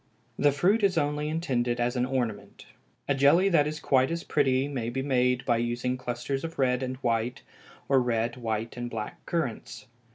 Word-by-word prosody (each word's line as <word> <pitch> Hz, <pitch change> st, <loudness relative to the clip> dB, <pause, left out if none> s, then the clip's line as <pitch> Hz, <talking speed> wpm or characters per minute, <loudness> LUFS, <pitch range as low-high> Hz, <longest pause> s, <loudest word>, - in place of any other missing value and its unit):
The 145 Hz, 0 st, +4 dB
fruit 185 Hz, +11 st, +2 dB
is 195 Hz, -4 st, +2 dB
only 150 Hz, 0 st, 0 dB
intended 125 Hz, -7 st, -1 dB
as 120 Hz, +1 st, 0 dB
an 125 Hz, 0 st, 0 dB
ornament. 125 Hz, -5 st, -3 dB, 0.4 s
A 140 Hz, -, +2 dB
jelly 145 Hz, +8 st, +4 dB
that 150 Hz, -5 st, +3 dB
is 155 Hz, +1 st, -4 dB
quite 130 Hz, -3 st, +2 dB
as 170 Hz, 0 st, -3 dB
pretty 135 Hz, -2 st, +1 dB
may 125 Hz, -5 st, -3 dB
be 130 Hz, +2 st, -3 dB
made 125 Hz, -2 st, +1 dB
by 120 Hz, -2 st, +2 dB
using 120 Hz, +2 st, -1 dB
clusters 125 Hz, +2 st, -4 dB
of 165 Hz, 0 st, -6 dB
red 125 Hz, -1 st, +2 dB
and 130 Hz, 0 st, -3 dB
white, 120 Hz, +1 st, -1 dB, 0.4 s
or 135 Hz, -1 st, +4 dB
red, 115 Hz, -1 st, 0 dB
white, 115 Hz, -2 st, -3 dB
and 120 Hz, 0 st, -4 dB
black 110 Hz, -2 st, -6 dB
currants. 155 Hz, -10 st, -3 dB
130 Hz, 185 wpm, -27 LUFS, 120-145 Hz, 0.4 s, The